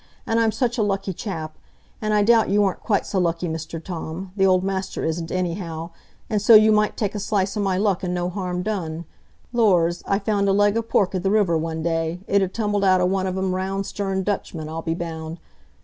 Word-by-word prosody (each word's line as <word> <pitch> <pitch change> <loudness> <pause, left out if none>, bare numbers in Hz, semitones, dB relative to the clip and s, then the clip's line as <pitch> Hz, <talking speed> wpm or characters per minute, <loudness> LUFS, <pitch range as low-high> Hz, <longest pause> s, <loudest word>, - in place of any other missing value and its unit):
An' 225 0 +1
I'm 225 -1 +3
such 245 0 -1
a - - +3
lucky 195 -2 -1
chap; 160 -5 -6 0.4
an' 215 -1 -1
I 210 -1 +3
doubt 230 +1 +4
you 205 +1 +3
aren't 195 -2 0
quite 205 -4 0
so 195 - -1
lucky, 170 0 0
Mr 160 0 -5
Tom,—th' 180 +3 -4
old 185 -1 +3
master 190 0 -3
isn't, 165 +1 -2
anyhow,—an' 170 +2 -4
so 215 +3 +7
you 215 0 +7
might 210 0 +2
take 205 -3 -1
a 210 - -3
slice 200 -1 -1
o' - - -2
my 190 -2 +1
luck, 200 -2 +1
an' 180 - -1
no 175 0 -1
harm 180 -1 -3
done. 170 -5 -3 0.5
Lors! 180 -7 +3
I 195 - +2
found 200 -1 0
a - - +3
leg 205 +1 +3
o' 230 - +2
pork 205 -4 +1
i' 185 - 0
the 195 +2 0
river 200 -5 +3
one 160 0 -2
day; 165 +1 -1
it 200 -1 +2
had 190 -1 0
tumbled 205 -2 -1
out 185 -1 +4
o' 180 - +2
one 190 +1 0
o' - - -1
them 190 0 -1
round 195 +1 -2
sterned 195 -2 -2
Dutchmen, 170 -6 -3
I'll 160 +1 -5
be 165 0 -2
bound. 165 -1 -5
190 Hz, 225 wpm, -23 LUFS, 170-205 Hz, 0.5 s, so